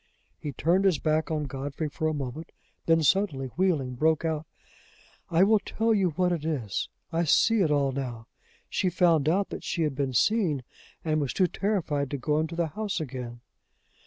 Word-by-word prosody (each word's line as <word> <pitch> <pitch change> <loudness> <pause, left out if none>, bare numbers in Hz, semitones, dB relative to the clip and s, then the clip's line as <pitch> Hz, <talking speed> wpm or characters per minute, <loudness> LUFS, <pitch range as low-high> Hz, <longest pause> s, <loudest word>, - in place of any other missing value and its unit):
He 145 - -4
turned 170 +8 +2
his 185 -5 +4
back 155 +1 0
on 155 -2 -1
Godfrey 140 +2 -4
for 155 +2 -2
a 155 - 0
moment, 140 +3 -6 0.3
then, 165 -1 +4
suddenly 145 -5 +1
wheeling, 155 -5 0
broke 160 +5 +1
out: 160 -1 -2 0.8
"I 170 +2 +4
will 215 +2 +5
tell 225 +2 0
you 195 -4 +2
what 180 +3 +1
it 165 -4 -2
is; 135 -11 -2 0.2
I 165 +1 +1
see 225 +8 +4
it 165 - +3
all 140 -2 +2
now; 125 -4 -5 0.4
she 185 - 0
found 165 -4 +3
out 195 +4 +1
that - - -6
she 170 - -1
had 150 -3 0
been 135 -1 -2
seen, 170 - +2 0.4
and 155 -1 +1
was 140 - -2
too 185 - +3
terrified 170 -7 -1
to 140 - -3
go 150 +3 0
into 160 +1 -2
the 170 -1 0
house 210 +1 -3
again! 125 -5 -6
155 Hz, 190 wpm, -27 LUFS, 140-180 Hz, 0.8 s, will